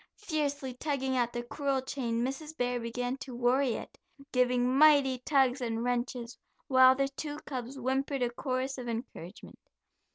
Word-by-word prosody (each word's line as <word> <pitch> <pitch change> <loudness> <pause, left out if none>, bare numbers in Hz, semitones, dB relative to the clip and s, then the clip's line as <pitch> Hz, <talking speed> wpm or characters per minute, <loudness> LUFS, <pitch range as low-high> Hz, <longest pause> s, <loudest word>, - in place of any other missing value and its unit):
Fiercely 290 -8 -2
tugging 265 -1 -2
at 240 -2 +1
the 240 0 -4
cruel 275 +2 -1
chain 240 -3 -2
Mrs. 300 +4 -5
Bear 245 0 0
began 245 +2 -3
to 260 -2 -8
worry 250 +1 +2
it, - - -9 0.3
giving 250 0 +2
mighty 280 -3 +5
tugs 265 -1 +2
and 230 -1 -2
wrenches, 245 -1 -2 0.3
while 260 -1 +7
the 275 +1 +1
two 290 +1 -6
cubs 255 -1 -5
whimpered 270 +1 -1
a 240 - 0
chorus 260 +1 -2
of 245 -1 -5
encouragement. 225 -5 -7
255 Hz, 155 wpm, -30 LUFS, 245-275 Hz, 0.3 s, while